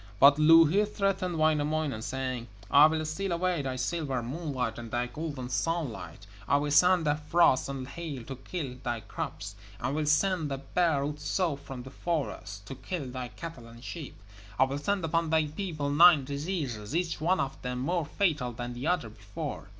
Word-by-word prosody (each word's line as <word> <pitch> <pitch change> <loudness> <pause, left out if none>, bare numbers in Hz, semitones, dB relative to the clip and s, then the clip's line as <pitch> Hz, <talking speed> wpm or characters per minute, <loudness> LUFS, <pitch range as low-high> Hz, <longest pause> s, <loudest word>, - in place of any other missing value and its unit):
But 140 +2 +7
Louhi 165 +5 +7
threatened 195 -4 -1
Wainamoinen, 155 -5 +1
saying: 130 -1 -3 0.2
'I 145 +1 +9
will 155 0 -1
steal 185 +5 -3
away 175 -1 0
thy 130 -2 -3
silver 135 -2 -2
moonlight 130 -4 -3
and 115 -1 -7
thy 120 +2 0
golden 140 0 -5
sunlight. 125 - -3 0.2
I 140 - +4
will 145 0 -1
send 180 +3 +5
the 145 - +3
frost 150 -2 +3
and 135 -2 -5
hail 150 -5 -6
to 135 +3 -7
kill 135 -2 -5
thy 120 -2 -2
crops, 100 -1 -6 0.3
and 135 - -2
will 155 -1 -1
send 160 0 +2
the 135 - -2
bear 155 0 +1
Otso 150 +3 -1
from 135 -2 -8
the 130 - -10
forests 140 - -3
to 120 - -7
kill 140 -2 -5
thy 125 -1 -4
cattle 135 -4 -9
and 115 +1 -13
sheep. 145 - -7 0.4
I 130 - +6
will 135 +2 -1
send 195 +3 0
upon 165 0 0
thy 160 -1 +3
people 155 -2 -3
nine 155 -2 +7
diseases, 140 - -3
each 170 -3 -1
one 180 +4 +2
of 135 0 -3
them 125 0 -3
more 160 +5 -1
fatal 150 -9 0
than 120 +1 -5
the 125 +5 -4
one 180 0 +2
before.' 105 -3 -7
145 Hz, 180 wpm, -29 LUFS, 130-165 Hz, 0.4 s, I